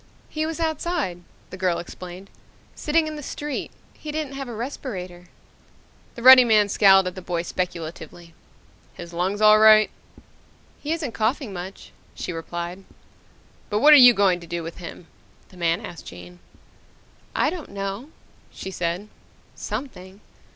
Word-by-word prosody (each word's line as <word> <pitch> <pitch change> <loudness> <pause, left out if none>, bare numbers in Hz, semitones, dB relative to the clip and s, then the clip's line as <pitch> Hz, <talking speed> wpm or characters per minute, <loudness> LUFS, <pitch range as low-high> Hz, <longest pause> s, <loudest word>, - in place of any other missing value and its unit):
"He 310 0 -2
was 325 0 -5
outside," 315 - -2 0.3
the 185 - -8
girl 185 -2 0
explained, 180 +2 -9 0.4
"sitting 315 +1 +1
in 310 -1 -5
the - - -7
street. 295 0 -5 0.2
He 305 - -8
didn't 300 -2 -4
have 275 -1 -6
a 240 - -7
respirator." 190 -8 -6 0.9
The 235 - -8
ruddy 260 0 +10
man 215 -3 +3
scowled 195 -2 +5
at 180 - -3
the 185 - -9
boy 175 -1 -3
speculatively. 170 -1 -6 0.6
"His 170 0 -10
lungs 190 +4 -2
all 215 0 +7
right?" 215 0 +7 0.9
"He 300 - -4
isn't 320 -6 -2
coughing 225 +1 -1
much," 185 +2 -8 0.2
she 180 - -5
replied. 170 +3 -6 0.9
"But 205 - 0
what 300 +8 +7
are - - +10
you 245 -3 +9
going 190 -3 +3
to 170 - -13
do 170 0 -4
with 165 +1 -8
him?" 175 0 -9 0.4
the 185 - -17
man 170 +4 0
asked 175 -6 -10
Jane. 90 0 -11 1.0
"I 295 - +2
don't 345 -4 -7
know," 200 +7 -5 0.4
she 190 - -8
said. 175 +3 -3 0.5
"Something. 205 -5 -7
195 Hz, 150 wpm, -23 LUFS, 175-265 Hz, 1.0 s, ruddy